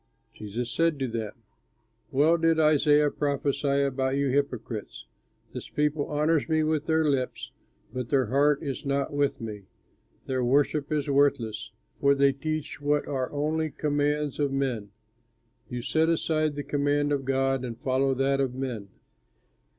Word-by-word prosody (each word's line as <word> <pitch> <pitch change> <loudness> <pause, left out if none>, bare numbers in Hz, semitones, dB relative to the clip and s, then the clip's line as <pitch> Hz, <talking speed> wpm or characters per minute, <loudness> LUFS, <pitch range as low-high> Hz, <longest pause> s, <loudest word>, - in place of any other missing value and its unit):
Jesus 115 +3 -5
said 165 -2 +1
to 135 -1 -1
them, 115 -3 -4 0.8
"Well 150 +4 +4
did 165 -1 +2
Isaiah 150 -1 +4
prophesy 140 -1 0
about 135 -1 0
you 140 -1 +1
hypocrites: 125 -5 -3 0.5
'This - - -7
people 150 0 0
honors 150 +1 +1
me 155 0 +2
with 155 -1 0
their 160 0 +2
lips, 135 -4 -1 0.4
but 125 -2 -4
their 135 -3 +3
heart 140 +5 +2
is 135 -4 -4
not 140 0 -1
with 145 -1 0
me; 105 -3 -7 0.6
their 130 -1 -1
worship 145 +3 +1
is 150 -2 0
worthless, 135 -6 +1 0.3
for 140 0 +4
they 140 0 +4
teach 155 +2 -4
what 145 0 +1
are 130 -2 -2
only 155 +2 -1
commands 145 0 -1
of 145 -2 +1
men.' 130 -7 -2 0.8
You 125 -1 -4
set 160 +4 +2
aside 155 -2 +1
the 145 - -4
command 145 0 0
of 140 -1 0
God 135 0 0
and 120 -2 -5
follow 135 0 +1
that 135 +1 +1
of 130 -2 -1
men. 120 -7 -4
140 Hz, 150 wpm, -27 LUFS, 130-150 Hz, 0.8 s, Well